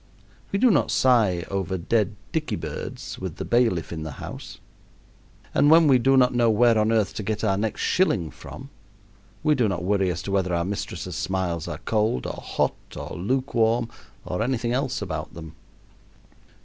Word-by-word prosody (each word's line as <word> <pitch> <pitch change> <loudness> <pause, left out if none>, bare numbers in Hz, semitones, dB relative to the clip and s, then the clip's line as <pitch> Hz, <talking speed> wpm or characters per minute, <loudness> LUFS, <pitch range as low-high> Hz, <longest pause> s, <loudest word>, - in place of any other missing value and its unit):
We 195 - +1
do 245 +3 +5
not - - +2
sigh 110 -9 +3
over 95 -1 -1
dead 105 +3 0 0.2
dicky 160 -1 -1
birds - - -6
with - - -5
the - - -5
bailiff 115 -10 +1
in 80 - -5
the 80 -2 -5
house, - - -8 1.0
and 145 - +4
when 160 0 +7
we 130 -3 +5
do 135 +3 +4
not 125 -1 +4
know 120 -1 +3
where 115 +2 +4
on 110 0 +2
earth 110 -4 +1
to - - -4
get 105 +1 -3
our 100 -3 +2
next 105 +2 -2
shilling 150 - +1
from, - - -11 0.7
we 155 0 +4
do 125 -6 +2
not 90 -4 -2
worry 95 0 +1
as 90 +1 -3
to 100 - -4
whether 95 -3 +1
our 85 0 0
mistress' 100 +1 -4
smiles 90 -4 -2
are - - -4
cold, 105 - +1
or - - -5
hot, - - 0 0.2
or - - -6
lukewarm, 115 +2 +1 0.4
or 90 - -3
anything 120 0 0
else 130 0 -1
about - - -5
them. 80 -1 -9
110 Hz, 180 wpm, -24 LUFS, 95-125 Hz, 1.0 s, when